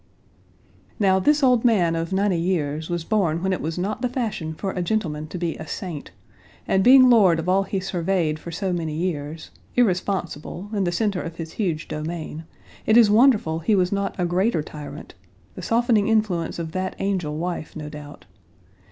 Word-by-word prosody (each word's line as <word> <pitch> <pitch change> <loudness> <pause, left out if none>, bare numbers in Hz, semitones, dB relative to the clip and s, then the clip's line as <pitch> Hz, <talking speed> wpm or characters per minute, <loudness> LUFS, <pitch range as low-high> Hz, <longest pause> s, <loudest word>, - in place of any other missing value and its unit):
Now 190 -2 +4
this 295 +9 +2
old 250 -3 +4
man 185 -9 +3
of 165 +1 -3
ninety 190 -2 +1
years 160 -3 -1
was 175 -1 -2
born 175 -5 0
when 190 0 +1
it - - -3
was 160 +2 -3
not 195 +6 -2
the 250 - 0
fashion 215 -11 -3
for 195 +4 -3
a 180 - -3
gentleman 170 -6 -2
to 180 - -6
be 170 -2 -2
a - - -8
saint, 170 -7 -6 0.6
and 190 - +2
being 255 +2 +8
lord 205 -9 +5
of 165 +2 -4
all 190 +2 +3
he 195 0 -2
surveyed 175 -4 -1
for 170 - -9
so 185 +2 -2
many 160 -3 -3
years, 160 -2 -4 0.2
irresponsible, 185 -3 -1
in 200 -3 0
the 175 - 0
center 200 0 0
of 165 0 -6
his 165 -1 -7
huge 170 -7 -2
domain, 160 0 -5 0.4
it 220 - +5
is 225 -3 +6
wonderful 215 -9 +4
he 205 +6 +2
was 180 -2 +2
not 200 0 -1
a 180 - +1
greater 175 -1 +1
tyrant 145 -1 -9 0.4
the - - -8
softening 230 -3 +2
influence 210 -7 0
of 165 -2 -4
that 185 +2 -3
angel 180 -7 -2
wife, 175 -1 -4
no 150 -2 -6
doubt. 150 -1 -10
180 Hz, 185 wpm, -23 LUFS, 160-205 Hz, 0.6 s, being